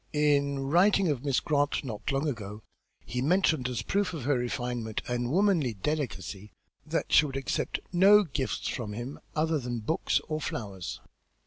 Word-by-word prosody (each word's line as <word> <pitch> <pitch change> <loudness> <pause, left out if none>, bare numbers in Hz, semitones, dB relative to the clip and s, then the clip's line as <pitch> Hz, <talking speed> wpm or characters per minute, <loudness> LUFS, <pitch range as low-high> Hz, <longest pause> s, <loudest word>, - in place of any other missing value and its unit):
In 145 -2 +2
writing 175 +7 +3
of 140 -3 -1
Miss 140 -3 +2
Grant 145 -2 0
not 115 -3 -4
long 140 +3 0
ago 105 -5 -5 0.4
he 125 - -3
mentioned 160 -3 +2
as 120 -4 -2
a - - -12
proof 200 -3 0
of 150 - -5
her 145 +3 +2
refinement 120 -2 -2
and 120 0 -1
womanly 170 - +2
delicacy 105 - -3 0.4
that 165 +1 -2
she 150 - +7
would 135 -1 -5
accept 135 - -2
no 200 +4 +7
gifts 140 -6 -3
from 110 -5 -3
him 120 +6 -6 0.2
other 155 0 +1
than 120 -2 -3
books 160 +10 +1
or 155 -1 -2
flowers." 100 - -5
140 Hz, 165 wpm, -29 LUFS, 120-155 Hz, 0.4 s, she